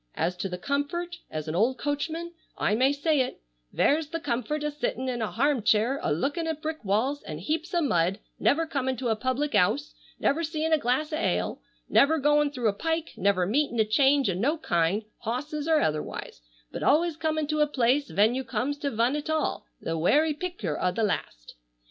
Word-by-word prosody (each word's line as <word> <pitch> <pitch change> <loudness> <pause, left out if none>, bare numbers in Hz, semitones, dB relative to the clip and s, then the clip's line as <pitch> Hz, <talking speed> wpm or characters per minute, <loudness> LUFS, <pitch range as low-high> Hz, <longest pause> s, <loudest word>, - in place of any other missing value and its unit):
As 175 +2 0
to 195 - -3
the 180 - -4
comfort, 315 - -2
as 155 0 -5
an 155 - -2
old 230 +9 +2
coachman 320 +4 -3 0.2
I 210 - +1
may 260 +5 +4
say 290 +1 +1
it,—vere's - - -1
the 330 - -3
comfort 290 +2 -2
o' 300 - -1
sittin' 260 -2 -3
in 245 -2 -2
a 220 - -1
harm 275 +1 +1
chair 225 +6 +2
a - - -1
lookin' 285 - -1
at 320 -2 -2
brick 310 -3 -4
walls, 225 +9 0
and 155 0 -7
heaps 310 - -2
o' 345 - +3
mud, 180 - +2 0.2
never 325 +3 +3
comin' 265 -5 -2
to 245 0 -2
a 220 - +2
public 260 +6 -1
'ouse, 215 +9 +2 0.3
never 320 +4 +1
seein' 320 0 -1
a 315 - +4
glass 280 +5 0
o' - - 0
ale, 330 - -1 0.3
never 315 +3 +4
goin' 295 0 +3
through 250 -5 -1
a - - -1
pike, 325 +7 -2
never 185 -1 +2
meetin' 240 +3 0
a 220 - +5
change 270 +4 +3
o' 190 - +1
no 260 - 0
kind 175 - +1 0.2
(hosses 290 +6 -3
or 315 -2 +4
otherwise), 150 - -3 0.3
but - - -6
always 325 +3 +3
comin' 315 -1 -1
to 305 +1 -1
a 300 - +4
place, 275 +1 +1
ven 205 +8 +3
you 265 +1 -2
comes 280 +4 -2
to 290 -2 -1
vun 235 +3 +1
at 300 +1 -4
all, 315 0 -1
the 165 0 -3
werry 300 - +3
picter 295 - -4
o' 180 - +2
the 225 - -1
last. - - -3
275 Hz, 205 wpm, -27 LUFS, 215-305 Hz, 0.3 s, a